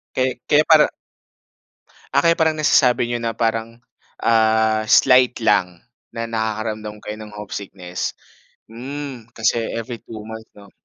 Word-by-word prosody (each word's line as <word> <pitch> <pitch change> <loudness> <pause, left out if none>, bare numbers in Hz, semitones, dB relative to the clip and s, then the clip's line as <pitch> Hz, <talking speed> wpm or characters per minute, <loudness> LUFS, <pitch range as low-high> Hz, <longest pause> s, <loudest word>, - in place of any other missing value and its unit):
Kay 130 -1 -1
kaya 150 +1 +5
parang. 155 -2 +6 1.2
Ah, 140 - +4
kaya 165 0 +3
parang 160 -1 +3
nasasabi 125 -5 +3
niyo 120 - -1
na 115 -1 -3
parang, 115 +1 -2 0.4
ah, 110 -1 +3
slight 125 0 +4
lang, 90 -5 +1 0.3
na 115 0 -4
nakakaramdam 110 -1 -3
kayo 105 - -6
ng 105 -1 -10
homesickness. 100 -3 -6 0.6
Hmm, 130 0 -7
kasi 115 +1 +1 0.2
every 115 0 -5
two-month 110 -2 -10 0.3
'no? 100 -1 -16
115 Hz, 125 wpm, -20 LUFS, 110-125 Hz, 1.2 s, parang